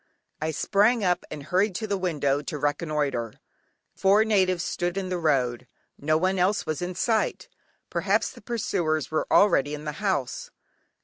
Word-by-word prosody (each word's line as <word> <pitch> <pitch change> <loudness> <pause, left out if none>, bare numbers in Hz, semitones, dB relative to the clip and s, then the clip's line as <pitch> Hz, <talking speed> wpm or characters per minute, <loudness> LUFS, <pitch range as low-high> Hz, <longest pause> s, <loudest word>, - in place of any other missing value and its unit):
I 155 - -1
sprang 210 +8 +2
up 180 -1 +1
and 150 -2 -7
hurried 185 +5 +1
to 220 - -2
the 200 -2 -1
window 145 -7 0
to 150 +1 -5
reconnoitre; 145 -6 -1 0.6
four 200 +3 +4
natives 185 -5 +2
stood 175 +1 -2
in 190 -1 -2
the 180 -1 -2
road; 130 -6 0 0.3
no 155 +2 +1
one 185 +3 +1
else 195 +4 +1
was 155 +1 -3
in 180 0 -4
sight; 220 +3 0 0.4
perhaps - - +1
the - - -14
pursuers 175 - -1
were 155 - 0
already 150 -8 +4
in 150 +1 -9
the 150 - -2
house. 145 -11 -1
175 Hz, 165 wpm, -26 LUFS, 150-195 Hz, 0.6 s, four